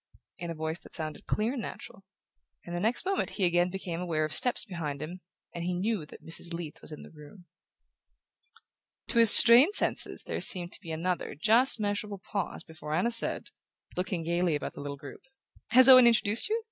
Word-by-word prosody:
in 170 Hz, 0 st, -7 dB
a 165 Hz, -, -6 dB
voice 160 Hz, +2 st, -5 dB
that -, -, -17 dB
sounded 155 Hz, -3 st, -6 dB
clear 220 Hz, +4 st, -2 dB
and 260 Hz, -, -5 dB
natural; 195 Hz, -, -10 dB, 0.6 s
and 175 Hz, -, -7 dB
the -, -, -3 dB
next 225 Hz, -, +2 dB
moment 390 Hz, +1 st, -2 dB
he 195 Hz, -, +1 dB
again 175 Hz, +1 st, +1 dB
became 180 Hz, -2 st, -7 dB
aware 160 Hz, -3 st, -2 dB
of 155 Hz, -, -5 dB
steps 245 Hz, -1 st, 0 dB
behind 160 Hz, -8 st, -6 dB
him, 170 Hz, +5 st, -9 dB, 0.3 s
and 170 Hz, -, -7 dB
knew 180 Hz, 0 st, -3 dB
that -, -, -16 dB
Mrs. 165 Hz, +1 st, -3 dB
Leath 165 Hz, -3 st, -9 dB
was -, -, -7 dB
in 150 Hz, -, -10 dB
the -, -, -15 dB
room. 155 Hz, +4 st, -16 dB, 1.6 s
To 235 Hz, -, +1 dB
his 230 Hz, -1 st, +10 dB
strained 250 Hz, -, +8 dB
senses -, -, -2 dB
there -, -, -6 dB
seemed 175 Hz, -2 st, -3 dB
to -, -, -7 dB
be 165 Hz, -, -12 dB
another 170 Hz, +3 st, -4 dB
just 225 Hz, -, +2 dB
measurable 205 Hz, 0 st, -4 dB
pause 195 Hz, 0 st, -6 dB
before 155 Hz, -1 st, -8 dB
Anna 190 Hz, +8 st, -1 dB
said, 230 Hz, -, +3 dB, 0.5 s
looking 180 Hz, -2 st, -4 dB
gaily 170 Hz, 0 st, -1 dB
about 145 Hz, -, -6 dB
the -, -, -10 dB
little 140 Hz, 0 st, -7 dB
group: 140 Hz, -1 st, -13 dB, 0.5 s
"Has 255 Hz, +3 st, +6 dB
Owen 255 Hz, -2 st, +8 dB
introduced 225 Hz, -, +2 dB
you? 445 Hz, +2 st, -1 dB
180 Hz, 195 wpm, -27 LUFS, 160-220 Hz, 1.6 s, his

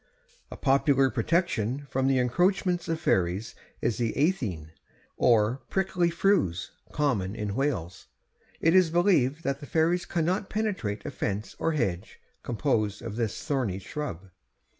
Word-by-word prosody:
A -, -, -8 dB
popular 135 Hz, -1 st, +3 dB
protection 135 Hz, -, 0 dB
from 130 Hz, 0 st, +1 dB
the 135 Hz, -1 st, +3 dB
encroachments 175 Hz, -, +1 dB
of 165 Hz, -1 st, -1 dB
fairies 95 Hz, -, 0 dB, 0.3 s
is 115 Hz, -2 st, 0 dB
the 115 Hz, -2 st, 0 dB
eithin, 115 Hz, -, -1 dB, 0.4 s
or 120 Hz, +2 st, +3 dB
prickly 180 Hz, -2 st, +1 dB
furze, 165 Hz, -, +1 dB, 0.2 s
common 110 Hz, -10 st, 0 dB
in 105 Hz, -2 st, -3 dB
Wales. 110 Hz, -, -2 dB, 0.5 s
It 165 Hz, -, +3 dB
is 185 Hz, -3 st, +5 dB
believed 165 Hz, -4 st, +2 dB
that 140 Hz, 0 st, -1 dB
the 145 Hz, -, -9 dB
fairies 170 Hz, +2 st, +1 dB
cannot 180 Hz, +4 st, -1 dB
penetrate 190 Hz, -, -2 dB
a -, -, -4 dB
fence 100 Hz, +2 st, -3 dB
or 165 Hz, -, +1 dB
hedge 95 Hz, -, -2 dB, 0.2 s
composed 115 Hz, -4 st, -1 dB
of 115 Hz, -2 st, -5 dB
this 115 Hz, -3 st, -2 dB
thorny 130 Hz, -, -1 dB
shrub. 95 Hz, -, -6 dB
135 Hz, 140 wpm, -27 LUFS, 105-165 Hz, 0.5 s, is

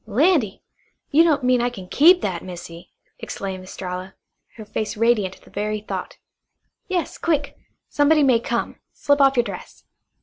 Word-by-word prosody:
"Landy! 255 Hz, -, +2 dB, 0.5 s
You 310 Hz, +3 st, +6 dB
don't 305 Hz, -5 st, +2 dB
mean 250 Hz, -1 st, +3 dB
I 245 Hz, -, +1 dB
kin 195 Hz, -7 st, -10 dB
KEEP 350 Hz, -, +5 dB
that, 180 Hz, -4 st, -3 dB
Missy?" 175 Hz, -2 st, -10 dB, 0.3 s
exclaimed 190 Hz, -1 st, -6 dB
Estralla, 185 Hz, 0 st, -7 dB, 0.4 s
her 220 Hz, -, -10 dB
face 215 Hz, 0 st, -4 dB
radiant 215 Hz, -4 st, +2 dB
at -, -, -22 dB
the -, -, -19 dB
very 210 Hz, +1 st, -2 dB
thought. 215 Hz, -, -6 dB, 0.7 s
"Yes, 365 Hz, -3 st, -2 dB
quick. 295 Hz, -4 st, -1 dB, 0.3 s
Somebody 295 Hz, +1 st, +3 dB
may 255 Hz, -4 st, +4 dB
come. 235 Hz, 0 st, -3 dB
Slip 285 Hz, 0 st, +1 dB
off 275 Hz, 0 st, +5 dB
your 240 Hz, -, +4 dB
dress." 200 Hz, -5 st, -9 dB
235 Hz, 160 wpm, -22 LUFS, 195-285 Hz, 0.7 s, You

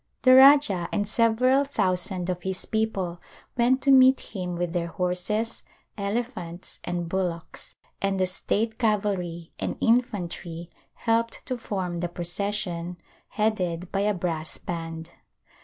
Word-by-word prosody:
The 255 Hz, -, +7 dB
Rajah 265 Hz, -9 st, +7 dB
and 205 Hz, -1 st, 0 dB
several 235 Hz, +5 st, +3 dB
thousand 185 Hz, -8 st, 0 dB
of 180 Hz, 0 st, -5 dB
his 190 Hz, +1 st, -2 dB
people 195 Hz, -6 st, -2 dB, 0.3 s
went 250 Hz, +2 st, +2 dB
to 275 Hz, -, +5 dB
meet 260 Hz, 0 st, +7 dB, 0.2 s
him 180 Hz, -2 st, -3 dB
with 175 Hz, -1 st, -2 dB
their 170 Hz, -1 st, -1 dB
horses, 180 Hz, +6 st, -2 dB, 0.3 s
elephants 200 Hz, -4 st, -4 dB
and 175 Hz, -1 st, -3 dB
bullocks, 175 Hz, -2 st, -4 dB, 0.3 s
and 195 Hz, -1 st, 0 dB
the 185 Hz, -, +3 dB
state 220 Hz, +4 st, -1 dB
cavalry 195 Hz, -7 st, -1 dB
and -, -, -3 dB
infantry 175 Hz, -8 st, -1 dB, 0.2 s
helped 230 Hz, 0 st, 0 dB
to 255 Hz, -, -2 dB
form 190 Hz, -7 st, -3 dB
the 175 Hz, 0 st, -2 dB
procession, 175 Hz, 0 st, -3 dB, 0.3 s
headed 185 Hz, -5 st, -1 dB
by 195 Hz, -, 0 dB
a 205 Hz, +1 st, +1 dB
brass 165 Hz, -3 st, -3 dB
band. 165 Hz, -1 st, -6 dB
190 Hz, 130 wpm, -26 LUFS, 175-225 Hz, 0.3 s, The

